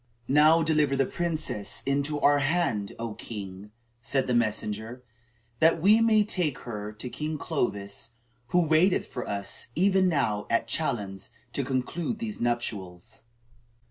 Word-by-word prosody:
"Now 155 +4 +5
deliver 150 -3 +2
the 135 0 +2
princess 155 -10 -2
into 140 +2 0
our 145 0 +5
hand, 135 - 0
O 115 -1 -4
king," 100 -2 -8 0.3
said 135 +2 0
the 125 - -1
messenger, 110 +1 -1 0.6
"that 165 +1 +4
we 210 +7 +5
may 220 -2 +5
take 175 -9 -1
her 105 -3 -6
to 110 +4 -6
King 155 +4 -4
Clovis, 105 -8 -3 0.3
who 175 +4 +3
waiteth 160 +4 +3
for 125 - -6
us 100 -1 -3
even 190 +1 +3
now 110 -10 0
at 115 0 +1
Chalons 100 -8 -3 0.2
to 140 - -1
conclude 135 - -2
these 220 -2 -4
nuptials." 110 -6 -3
135 Hz, 140 wpm, -27 LUFS, 110-160 Hz, 0.6 s, Now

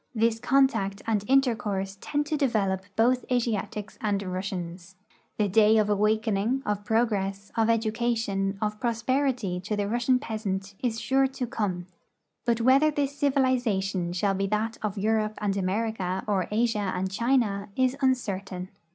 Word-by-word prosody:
This 225 0 +2
contact 225 -7 +2
and 215 -3 0
intercourse 220 -8 +1
tend 295 0 -1
to 305 - -1
develop 215 -10 +1
both 250 +3 +3
Asiatics 215 -4 -2
and 205 -2 0
Russians. 185 -1 -5 0.4
The 210 - +2
day 215 +2 +5
of 210 -1 +2
awakening, 215 +4 +1
of 205 -1 -1
progress, 200 -3 0
of 225 0 +2
education, 220 -3 0
of 210 0 -2
prosperity 240 -4 0
to 205 +4 -3
the 205 -1 -1
Russian 240 +3 +2
peasant 200 -4 -4
is 230 -3 -1
sure 270 +2 +2
to 265 -1 -4
come; 205 -8 -2 0.6
but 235 -1 +1
whether 270 +5 +5
this 285 -2 -1
civilization 245 -11 +1
shall 195 +3 +1
be 195 +1 -1
that 215 +2 -1
of 210 -1 -3
Europe 215 +1 0
and 200 -2 -1
America 190 -1 -1
or 195 -4 0
Asia 210 -3 0
and 185 +1 -2
China 215 -3 +1
is 260 0 +2
uncertain. 195 -8 -1
215 Hz, 145 wpm, -27 LUFS, 195-240 Hz, 0.6 s, day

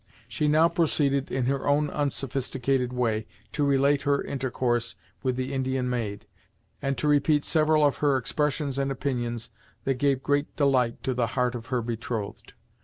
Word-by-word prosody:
She 150 - -1
now 155 +2 +5
proceeded 145 -5 +1
in 130 -2 0
her 135 +1 -1
own 145 +1 +2
unsophisticated 135 -2 -1
way 115 -4 -1 0.2
to 145 - -1
relate 140 0 +3
her 140 0 +1
intercourse 125 -3 -1 0.3
with 130 -2 0
the 130 +2 -3
Indian 130 -1 -1
maid, 110 -4 -3 0.6
and 135 -1 -1
to 135 - -1
repeat 145 0 +3
several 155 -1 +3
of 145 - +2
her 145 -2 +3
expressions 140 +1 -1
and 135 0 0
opinions 120 -4 -3 0.3
that 135 -2 -1
gave 135 -1 +2
great 145 +1 0
delight 130 -5 +2
to 130 - 0
the 120 -1 0
heart 125 -1 +2
of 120 -1 -7
her 125 -2 -1
betrothed. 115 -2 -5
135 Hz, 165 wpm, -27 LUFS, 125-145 Hz, 0.6 s, now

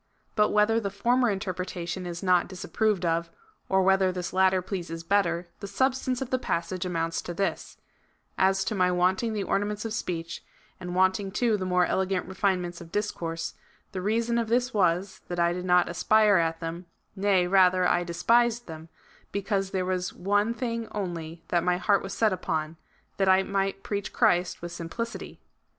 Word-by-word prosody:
But 210 -1 +3
whether 210 +2 +3
the 200 -3 -3
former 240 +5 +2
interpretation 185 -2 -4
is 170 +1 -6
not 180 -2 +3
dis 185 -1 -8
approved 210 -5 0
of, 165 0 0 0.4
or 190 0 +3
whether 190 0 +3
this 180 -1 -5
latter 190 0 +4
pleases 175 -3 -5
better, 175 -2 +1
the 200 - -6
sub 260 +6 +2
stance 255 -1 -2
of 260 - -11
the 255 - +1
passage 180 -3 -2
amounts 165 -1 -1
to 175 - -6
this: 195 +2 -2 0.3
" - - -39 0.3
As 190 0 +3
to 215 - -2
my 180 -3 +2
wanting 185 +5 +1
the 205 -2 -1
ornaments 205 +2 -1
of 225 - -3
speech, 170 -6 -4 0.4
and 180 -1 -5
wanting, 190 +2 +2
too, 225 +3 +1
the 185 -2 -3
more 180 -1 +3
elegant 190 0 0
refinements 185 -2 -1
of 165 -1 -11
discourse, 165 -5 -3 0.4
the 185 - -4
reason 230 +4 +1
of 230 - -1
this 245 +3 +1
was, 185 -1 +1
that 175 - -4
I 170 0 +3
did 180 +1 -5
not 180 -1 +4
aspire 210 +3 +4
at 165 0 0
them, 170 +2 -5 0.3
nay 195 -2 +2
rather, 185 -1 +4
I 175 - +2
despised 230 +7 +2
them, 160 0 -9 0.4
because 195 -1 -1
there 185 -1 -1
was 185 -1 -2
one 205 +4 +1
thing 230 -2 -3
only 170 -5 -5
that 175 -1 +2
my 180 0 +2
heart 200 +2 +2
was 195 - -6
set 220 -3 +2
upon 160 -3 -3 0.2
— - - -39
that 195 -1 +2
I 190 0 +5
might 195 0 -2
preach 205 -1 -3
Christ 180 -7 +1
with 175 - -5
simplicity." 175 +8 -6
190 Hz, 185 wpm, -27 LUFS, 175-205 Hz, 0.4 s, I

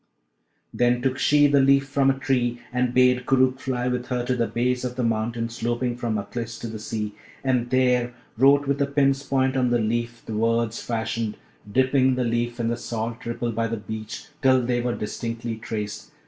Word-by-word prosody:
Then 120 0 +2
took 130 -1 0
she 145 0 +5
the 145 -1 +4
leaf 135 0 +4
from 135 -1 +2
a 135 - +1
tree 125 -3 0
and 125 -1 +1
bade 125 0 +3
Koorookh 130 0 +3
fly 125 -3 -2
with 125 0 -2
her 125 -1 -1
to 125 - 0
the 120 -2 0
base 125 +1 0
of 125 -1 -3
the 125 - -1
mountain 115 +1 -1
sloping 120 +1 -2
from 120 -3 -2
Aklis 115 +2 -5
to - - -4
the 110 -1 -6
sea, 105 -1 -4 0.3
and 125 -3 +1
there 125 -1 +2 0.2
wrote 140 +4 +5
with 140 0 0
a 140 - +2
pin's 140 -1 +2
point 135 -1 +1
on 125 -2 +2
the 120 - +3
leaf 115 +1 -2
the 110 - -5
words 115 +1 0
fashioned, 115 -2 -2 0.3
dipping 130 +2 +3
the 125 - 0
leaf 120 +1 -1
in 115 -1 0
the 120 - -1
salt 115 +1 -4
ripple 120 0 -2
by 115 0 -1
the 115 0 -3
beach, 110 +1 -7 0.2
till 130 -2 +4
they 120 0 0
were 120 0 -1
distinctly 115 +1 -4
traced. 105 -2 -5
120 Hz, 200 wpm, -24 LUFS, 115-130 Hz, 0.3 s, she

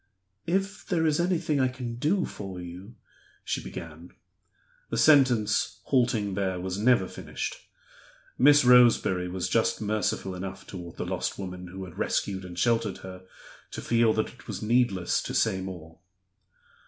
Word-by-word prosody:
"If 195 +4 -1
there 165 -3 +1
is 155 0 +2
anything 170 -4 +1
I 130 - +3
can 125 -2 -6
do 170 +9 +1
for 95 -3 -7
you 90 +6 -9 0.2
" - - -32
she - - -2
began. 85 +1 -9 0.8
The - - -2
sentence, 130 -8 +4
halting 120 -6 +1
there, 95 -2 -1
was 95 +2 -4
never 125 +3 +3
finished. - - -5 0.8
Miss 145 -2 +6
Roseberry 120 -7 +5
was 90 0 -2
just - - +1
merciful 105 -3 -1
enough 95 +1 -7
toward 85 -3 -9
the - - -4
lost - - -3
woman 90 -2 -6
who 95 +2 -7
had 90 - -12
rescued 95 -2 -1
and 90 -1 -9
sheltered 115 +2 +1
her 95 0 -10 0.4
to - - -7
feel 115 -1 +3
that 110 - -1
it 125 - -17
was - - -5
needless 105 -5 +2
to - - -5
say 95 - +2
more. 85 -4 -8
105 Hz, 155 wpm, -27 LUFS, 95-125 Hz, 0.8 s, Miss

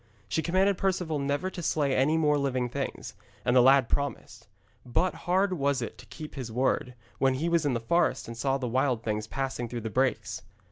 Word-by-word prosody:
She 160 - 0
commanded 190 +3 +2
Perceval 180 -5 0
never 145 +7 -1
to 175 - -6
slay 145 -4 +1
any 150 +5 +3
more 150 -2 +3
living 130 -3 0
things, 140 +2 -4 0.3
and 120 - +2
the 125 - +8
lad 135 0 +6
promised. 115 -6 -3 0.4
But 150 +9 0 0.2
hard 190 +1 +3
was 140 -4 +1
it 115 - -6
to - - -13
keep 155 -2 -9
his 125 -5 -6
word, 125 +1 0 0.2
when 135 -1 +3
he 155 +6 -1
was 170 -3 +2
in 130 - +1
the - - 0
forest 170 +10 +1
and 115 - -6
saw 135 +3 0
the 130 -2 -3
wild 125 -1 +1
things 110 0 -2
passing 130 -2 -3
through 120 0 -4
the 110 0 -5
brakes. 125 -4 0
135 Hz, 205 wpm, -28 LUFS, 120-155 Hz, 0.4 s, the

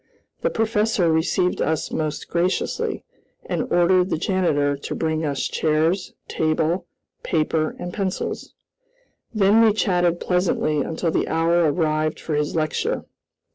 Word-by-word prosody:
The - - +1
professor 215 -5 +1
received 160 +3 +1
us 160 -1 -1
most 155 -2 -3
graciously, 175 +2 -1 0.4
and - - -3
ordered 180 +1 +3
the - - 0
janitor 155 -6 +1
to 140 - -6
bring 160 0 -1
us 140 -3 -1
chairs, 160 +4 0
table, 160 +3 0 0.3
paper, 155 -1 0
and 175 0 -6
pencils. 195 -2 -3 0.8
Then 215 0 +4
we 220 -2 +5
chatted 175 -5 +1
pleasantly 180 -4 +1
until 160 +3 -2
the - - 0
hour 165 0 +2
arrived 155 -1 0
for 160 - -4
his 150 +1 -1
lecture. 155 -1 -1
165 Hz, 130 wpm, -22 LUFS, 155-185 Hz, 0.8 s, we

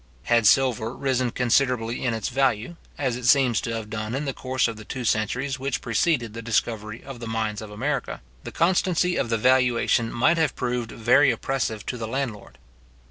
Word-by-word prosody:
Had 115 -2 +3
silver 120 0 +3
risen 130 -2 0
considerably 125 -1 +1
in 120 -3 0
its 110 +1 -3
value, 130 +2 0 0.2
as 130 -4 -1
it 125 0 -4
seems 130 -5 +4
to 115 - -3
have 110 -2 -5
done 110 +2 -3
in 145 +2 -2
the 135 - -2
course 130 0 0
of 115 - -4
the 110 - -10
two 125 +3 -5
centuries 125 +5 0
which 135 0 -2
preceded 120 0 0
the 115 - -6
discovery 110 -1 -2
of 135 -3 -9
the 115 - -6
mines 110 -2 -2
of 110 - -8
America, 130 +5 -3 0.2
the - - -7
constancy 180 0 +2
of 120 - -1
the 115 - +1
valuation 125 -1 +2
might 160 +8 +2
have 160 -4 +1
proved 120 -2 -2
very 130 +5 +4
oppressive 115 -3 -2
to 125 - -4
the 110 - -4
landlord. 120 -4 -4
120 Hz, 190 wpm, -24 LUFS, 115-135 Hz, 0.2 s, seems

